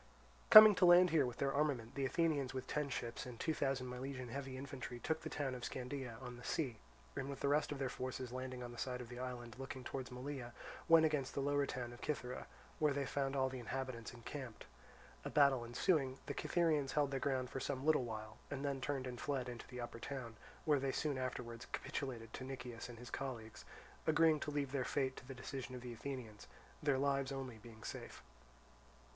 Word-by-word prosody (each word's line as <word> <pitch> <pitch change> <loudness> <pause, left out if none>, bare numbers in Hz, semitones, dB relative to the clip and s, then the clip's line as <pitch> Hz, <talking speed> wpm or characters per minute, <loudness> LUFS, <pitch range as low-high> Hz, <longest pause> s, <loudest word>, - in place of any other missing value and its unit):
Coming 215 0 +13
to - - +6
land 175 0 +8
here 150 -5 +4
with 125 - -5
their 135 0 +1
armament, 140 -6 +1
the 135 -1 0
Athenians 145 -5 +1
with 130 - -3
ten 150 -1 -1
ships 120 -1 -3
and 120 -2 -8
two 160 - +1
thousand 135 -3 0
Milesian 125 0 -5
heavy 135 +1 -4
infantry 130 -2 -5
took 160 +5 -1
the - - -4
town 140 -3 -1
of 125 -1 -6
Scandea, 125 -2 -4
on 125 -1 -6
the 125 - -11
sea; 125 -8 -1 0.4
and 135 - -2
with 140 - -6
the - - +2
rest 145 +1 +3
of 145 - -2
their 135 -1 0
forces 130 0 -4
landing 130 0 -4
on 120 - -6
the 120 - -9
side 125 -1 -2
of 120 -2 -7
the 120 0 -7
island 125 -2 -5
looking 135 -1 -5
towards 130 0 -4
Malea, 125 -1 -5 0.4
went 165 -1 +9
against 150 -4 0
the - - 0
lower 145 0 +2
town 120 -1 -4
of 120 - -11
Cythera, 125 -4 -3 0.3
where 150 -2 +4
they 140 0 0
found 135 0 -1
all 130 -1 +3
the 130 -1 -5
inhabitants 125 -1 -4
encamped. 120 0 -7 0.6
A - - -3
battle 140 -4 +5
ensuing, 130 +2 +2
the - - -3
Cytherians 155 -6 +2
held 145 -2 +2
their 135 - 0
ground 130 -2 0
for - - -2
some 135 0 -2
little 155 -4 +5
while, 110 -2 -5
and 140 0 -3
then 140 -2 -1
turned 135 -1 -1
and 125 -1 -5
fled 135 -4 -1
into 120 -1 -7
the 125 - -7
upper 120 -1 -5
town, 125 -3 -5 0.3
where 150 -3 +4
they 135 0 0
soon 145 -1 0
afterwards 125 -2 -4
capitulated 120 -5 -4
to - - -5
Nicias 125 -3 -6
and 120 - -8
his 120 +2 -9
colleagues, 120 -5 -5 0.4
agreeing 160 0 +5
to 150 - -3
leave 145 -2 -1
their 135 -2 0
fate 130 0 0
to 125 - -10
the 135 - -6
decision 130 0 -5
of 125 - -6
the 120 -1 -6
Athenians, 115 -3 -6 0.3
their 145 -3 +3
lives 135 0 +1
only 130 -4 -5
being 110 -1 -12
safe. - - -6
130 Hz, 215 wpm, -38 LUFS, 125-140 Hz, 0.6 s, Coming